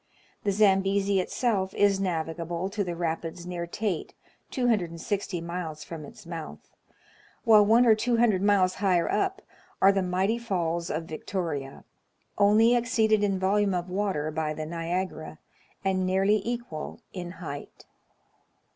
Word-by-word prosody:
The 205 - +1
Zambezi 195 -1 +3
itself 190 -1 -1
is 200 -1 +3
navigable 170 0 -2
to 205 0 -1
the 175 -2 -4
rapids 165 0 -3
near 175 -1 -4
Tete, 195 -2 -3 0.3
260 195 -5 -1
miles 170 -2 -5
from 160 -3 -8
its - - -13
mouth; 165 -2 -8 0.7
while 220 -3 +7
one 230 +4 +5
or 225 - +7
two 235 +2 +1
hundred 220 -5 +3
miles 195 -2 +3
higher 180 -4 +3
up 390 0 -1 0.4
are 195 - +6
the 195 -1 +1
mighty 190 +5 0
falls 170 -6 -2
of 160 +2 -2
Victoria, 160 -4 -4 0.6
only 215 +4 +5
exceeded 220 -3 +2
in 195 -2 +1
volume 195 +1 +2
of 180 0 -3
water 185 -6 -1
by 155 0 -2
the 155 - -4
Niagara, 165 - -4 0.5
and 190 -1 +1
nearly 195 +3 +2
equal 235 -9 -5
in 175 -2 -6
height. 150 -6 -8
190 Hz, 140 wpm, -27 LUFS, 170-205 Hz, 0.7 s, while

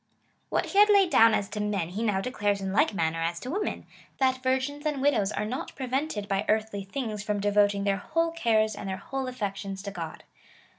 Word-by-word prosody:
Wliat - - +1
he 400 - +1
had 420 +1 +7
laid 395 -4 +5
down 225 -1 +6
as 200 - -1
to 210 - -5
men 205 -5 -1
he 195 +5 -4
now 210 -4 +1
declares 205 -3 -1
in 190 -1 -3
like 290 0 +3
manner 165 -1 0
as 170 +1 -1
to 255 - -5
women 410 +5 -2 0.2
— - - -28
that 260 -1 +2
virgins 260 +3 -1
and 300 -3 -1
widows 265 -8 +2
are 210 - -2
not 250 +5 -5
prevented 260 -4 -2
by 195 0 0
earthly 215 -2 0
things 215 0 -4
from 210 0 -1
devoting 205 0 +2
their 200 -1 +1
whole 330 - 0
cares 220 -9 +2
and 195 - -6
their 190 - -3
whole 270 +3 -4
affections 195 -5 -4
to 200 - -5
God. 165 -4 -7
215 Hz, 215 wpm, -27 LUFS, 200-265 Hz, 0.2 s, had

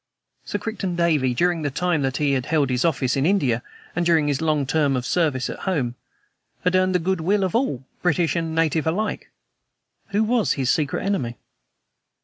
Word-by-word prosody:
Sir - - -3
Crichton 205 -4 -3
Davey, 155 -7 +2
during 175 +2 +1
the 145 - -1
time 170 +2 0
that 135 0 -1
he 145 -2 +1
had 130 -2 -1
held 145 -4 +1
office 135 -6 +1
in 135 - +1
India, 145 - +2 0.3
and 175 - +1
during 165 -3 +3
his 145 -1 0
long 155 -3 +1
term 145 -1 +1
of 125 -1 -2
service 145 -7 +1
at - - -6
home, 135 -10 0 0.7
had 180 - +2
earned 185 0 +2
the - - +6
good 180 0 -1
will 195 +4 +2
of 185 - -1
all, 225 - 0 0.2
British 175 -1 +1
and 165 -1 -2
native 160 -1 +1
alike. 205 +7 -2 0.8
Who 210 +1 +1
was 225 -1 +2
his 130 -3 0
secret 150 +2 -1
enemy? 130 -13 -1
160 Hz, 185 wpm, -23 LUFS, 140-180 Hz, 0.8 s, the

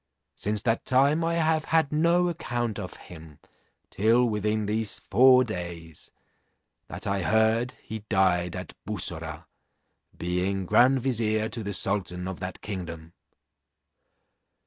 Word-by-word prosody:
Since 105 0 -2
that 115 -1 0
time 140 +5 +3
I 165 0 0
have 160 -1 +1
had 160 -3 +2
no 170 +3 +3
account 120 -9 -3
of 90 -3 -7
him 80 -4 -13 0.5
till 115 +4 +3
within 105 0 -1
these 110 0 0
four 130 +5 +5
days, 85 -7 -7 0.8
that - - -8
I 100 0 -1
heard 110 +5 +2
he 110 +1 -6
died 90 -3 +2
at 90 0 -6
Bussorah, 80 -5 -4 0.7
being 90 +2 -1
grand 130 +7 +4
vizier 110 -4 0
to 115 - -5
the 100 -1 -4
sultan 90 -2 -1
of 95 - -6
that 90 0 -6
kingdom. 85 -5 -7
105 Hz, 125 wpm, -26 LUFS, 90-125 Hz, 0.8 s, four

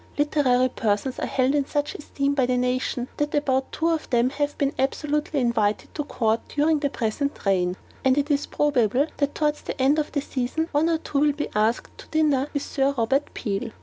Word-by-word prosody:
Literary 270 -4 +3
persons 225 +2 -1
are - - -2
held 260 +1 +1
in 285 -2 +1
such 290 0 -1
esteem 280 -1 -2
by 265 -3 +2
the 250 0 +1
nation 250 0 -1
that 295 0 -1
about 265 -2 +1
two 330 +2 0
of 325 -2 -1
them 245 0 +2
have 290 0 -2
been 280 0 0
absolutely 295 +2 0
invited 220 -4 0
to 295 - -2
court 225 -5 +1
during 300 +1 +2
the 285 -1 0
present 270 +3 -2
reign; 180 -2 +2 0.3
and 265 0 +3
it 290 +1 +1
is 285 0 +1
probable 265 -3 +2
that 285 0 -1
towards 300 -1 0
the - - -6
end 275 +4 +3
of 300 - -2
the 285 - 0
season, 275 +5 -2
one 305 +3 +2
or 330 - +2
two 295 -3 -2
will 295 0 +3
be 295 +1 -3
asked 215 +3 0
to - - -11
dinner 295 -4 +2
by - - -1
Sir 275 0 0
Robert 265 +5 +1
Peel. 210 +1 -2
275 Hz, 210 wpm, -24 LUFS, 250-295 Hz, 0.3 s, Literary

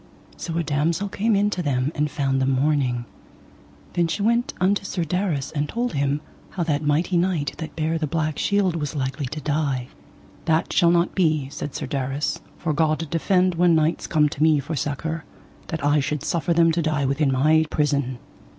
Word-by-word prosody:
So 165 -1 -4
a 170 - +1
damosel 160 +6 0
came 215 +3 +1
in 205 +1 +2
to 185 - -2
them 140 -3 0
and 150 0 0
found 135 -1 0
them 130 - +2
mourning. 130 -3 +1 0.9
Then 170 -1 +2
she 200 +5 -2
went 235 +3 +2
unto 195 +2 +2
Sir 185 -3 -2
Darras, 165 -4 -1
and 145 -1 -2
told 240 +1 -2
him 140 0 0 0.3
how 180 - -2
that 150 -3 0
mighty 160 +5 +1
knight 170 -5 0
that 160 - -6
bare 160 +1 0
the 155 - -1
black 155 0 -1
shield 200 -4 +1
was 150 -2 -3
likely 135 0 -2
to 150 +5 -5
die. 140 -4 -1 0.6
That 160 0 +1
shall 170 -3 +5
not 170 0 +2
be, 155 -7 +1
said 145 -1 -6
Sir - - -3
Darras, 135 0 -2 0.2
for 160 -2 -1
God 160 +1 +1
defend 185 +2 +2
when 170 0 +4
knights 160 +1 +1
come 150 -2 +3
to 145 - -7
me 155 -1 +5
for 145 +4 -4
succour 150 +4 -3 0.4
that 160 -4 -3
I 145 +1 +4
should 145 +1 -2
suffer 170 +1 -1
them 165 0 +5
to 170 +1 0
die 155 -3 0
within 140 +1 +1
my 155 +4 +3
prison. 140 -4 0
155 Hz, 195 wpm, -23 LUFS, 145-170 Hz, 0.9 s, shall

